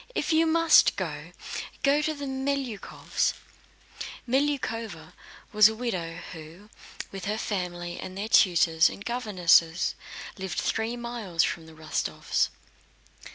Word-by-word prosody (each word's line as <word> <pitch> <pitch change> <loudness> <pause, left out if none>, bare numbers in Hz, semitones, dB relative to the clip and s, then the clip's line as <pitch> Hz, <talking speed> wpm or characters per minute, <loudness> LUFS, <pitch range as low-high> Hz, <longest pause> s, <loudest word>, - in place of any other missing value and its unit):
If - - 0
you 325 +1 +4
must 330 0 +5
go, - - -5 0.5
go 280 +2 +4
to 310 +1 -1
the 285 -1 -6
Melyukóvs'." 265 -4 -2 0.9
Melyukóva 230 - -1 0.4
was 215 0 +8
a 220 - -5
widow, 185 -9 -3 0.2
who, 165 +6 -12 0.4
with 195 -1 -7
her 210 +1 -1
family 175 -4 -3
and 185 0 -7
their 205 +2 -3
tutors 170 -5 +5
and 200 - -9
governesses, 185 -8 +3 0.5
lived 190 -3 -4
three 225 +2 -1
miles 230 -8 -1
from 165 -1 -2
the 160 - -13
Rostóvs. 155 0 -1
210 Hz, 120 wpm, -27 LUFS, 175-250 Hz, 0.9 s, was